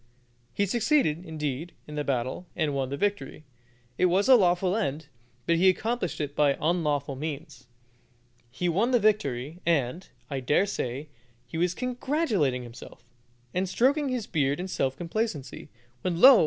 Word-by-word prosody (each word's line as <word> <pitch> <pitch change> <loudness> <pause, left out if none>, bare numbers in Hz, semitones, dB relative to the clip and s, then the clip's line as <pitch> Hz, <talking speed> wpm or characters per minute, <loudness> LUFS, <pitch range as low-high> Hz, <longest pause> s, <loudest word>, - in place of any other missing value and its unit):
He 200 - +1
succeeded, 210 - +2
indeed, 155 -1 -4
in 150 - -10
the 150 0 -2
battle, 130 +5 -2
and 155 -3 0
won 135 -2 -1
the 140 - -3
victory. 205 -5 -2 0.6
It 185 - +5
was 190 +3 +2
a 265 - +9
lawful 180 -2 +3
end, 160 -8 -2 0.4
but 170 - +3
he 185 +3 +6
accomplished 215 0 -1
it 145 -1 -3
by 145 -2 +3
unlawful 150 -4 0
means. 150 -1 -6 0.8
He 175 +8 -2
won 195 +8 +2
the 250 -2 +4
victory, 160 - 0
and, 165 +1 0 0.2
I 135 0 -3
dare 145 +9 +2
say, 140 -6 -4 0.4
he 125 +7 -5
was 180 +1 +1
congratulating 245 - 0
himself, 120 0 -12 0.5
and 185 +1 0
stroking 275 - +2
his 250 -4 -2
beard 145 -5 0
in 185 - -3
self 135 -7 -1
complacency, 170 - -3 0.3
when, 175 -2 -1
lo! 260 +1 +10
170 Hz, 155 wpm, -27 LUFS, 140-205 Hz, 0.8 s, lo